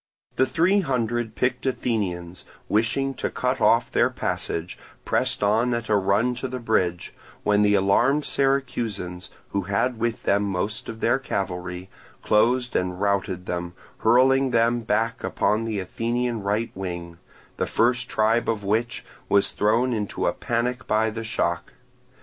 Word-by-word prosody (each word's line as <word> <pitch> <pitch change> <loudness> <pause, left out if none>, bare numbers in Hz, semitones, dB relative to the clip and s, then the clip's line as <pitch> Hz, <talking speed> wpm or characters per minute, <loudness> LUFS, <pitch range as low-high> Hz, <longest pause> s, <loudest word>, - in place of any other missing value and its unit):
The 130 - +3
three 185 +5 +3
hundred 120 - -1
picked 125 -1 0
Athenians, 95 -9 -2 0.2
wishing 120 +6 +1
to - - -3
cut 125 +1 -1
off 115 +1 +4
their - - +3
passage, 85 +2 -3 0.3
pressed 130 -4 0
on 115 +4 +2
at 115 -1 -4
a 105 - +4
run 100 +5 +2
to 130 - -3
the 130 0 -5
bridge, 95 -7 -1 0.3
when 105 0 +3
the 105 0 +4
alarmed 120 +9 +3
Syracusans, 120 -10 -1 0.2
who 100 - -1
had 100 +5 -1
with 115 0 -1
them 100 +1 +2
most 100 +1 -2
of 110 - -7
their 120 +3 +2
cavalry, 90 -6 -4 0.4
closed 120 +4 +2
and 90 0 -1
routed 100 -2 -1
them, 90 0 -4 0.2
hurling 130 +3 +4
them 115 0 +2
back 115 +2 -1
upon 110 +2 0
the 110 -3 -2
Athenian 115 +4 -2
right 105 +4 -1
wing, 85 -3 -6 0.4
the - - -1
first 125 +2 +1
tribe 110 +2 +2
of 110 -2 -1
which 110 +4 -1 0.2
was 100 -1 +3
thrown 115 +4 +2
into 105 -3 -2
a - - +2
panic 120 +2 -2
by 110 +1 +2
the 115 +1 -5
shock. 85 -6 -2
110 Hz, 150 wpm, -24 LUFS, 100-125 Hz, 0.4 s, off